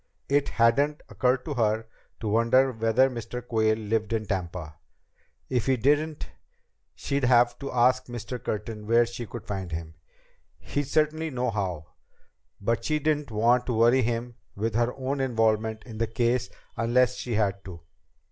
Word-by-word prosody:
It 140 0 +2
hadn't 140 +6 +2
occurred 125 0 +1
to 150 - -3
her 110 -3 +1 0.4
to 110 - -3
wonder 115 +5 +3
whether 115 +2 +3
Mr. 125 -1 -6
Quayle 110 -2 +2
lived 110 0 -1
in 110 -1 -1
Tampa. 90 -5 -4 0.7
If 125 -2 -1
he 130 -1 +3
didn't, 150 +5 +1 0.7
she'd 140 -2 -1
have 120 -1 +4
to 140 - -5
ask 125 +1 +3
Mr. 120 +1 -6
Curtin 105 0 -4
where 115 +1 +5
she 120 0 -7
could 120 - -8
find 95 -3 -4
him. 80 0 -5 0.6
He'd 145 -1 -3
certainly 155 +2 +1
know. 105 - -2 0.7
But 115 +3 -1
she 155 +4 +1
didn't 150 -1 0
want 120 +3 +2
to 125 - 0
worry 120 +4 +5
him 120 +1 -2 0.2
with 110 +2 -2
her 120 +2 +1
own 135 +1 -3
involvement 110 -3 +1
in 110 -3 -9
the 115 - +1
case 120 +2 0 0.3
unless 125 +2 +2
she 120 -3 -3
had 100 -2 0
to. 85 -3 -9
120 Hz, 155 wpm, -27 LUFS, 110-130 Hz, 0.7 s, where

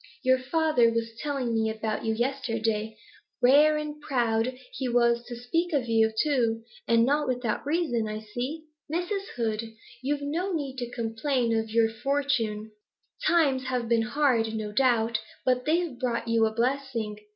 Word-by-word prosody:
Your 260 0 +4
good 255 0 -12
father 310 -8 +3
was 230 0 -2
telling 275 -5 -2
me 220 -1 +1
about 220 -1 -3
you 220 0 0
yesterday; 225 -3 -1 0.4
rare 295 +5 +6
and 300 0 -5
proud 245 -3 0 0.2
he 260 - -2
was 235 0 +3
to 240 - -6
speak 330 +9 -1
of 265 -4 +1
you, 225 -1 +3
too, 235 -7 +1 0.2
and 230 0 +4
not 290 +3 +1
without 250 -3 -1
reason, 290 -9 0
I 215 0 -4
see. 250 +9 -5 0.3
Mrs. 390 +4 -2
Hoed, 220 -2 0 0.4
you've 285 +2 -1
no 345 +7 -2
need 280 -5 -3
to 245 -2 -4
complain 235 +1 -1
of 225 0 -1
your 225 0 +3
for 275 +6 -1
tune. 220 -6 -1 0.6
Times 280 -7 +3
have 250 -2 -1
been 230 0 +3
hard, 235 -3 +1
no 215 -1 -3
doubt, 230 -1 +2 0.3
but 250 -1 +2
they've 320 -5 0
brought 235 -2 -1
you 230 -1 +3
a - - -3
blessing. 230 -3 -1
245 Hz, 165 wpm, -27 LUFS, 225-285 Hz, 0.6 s, rare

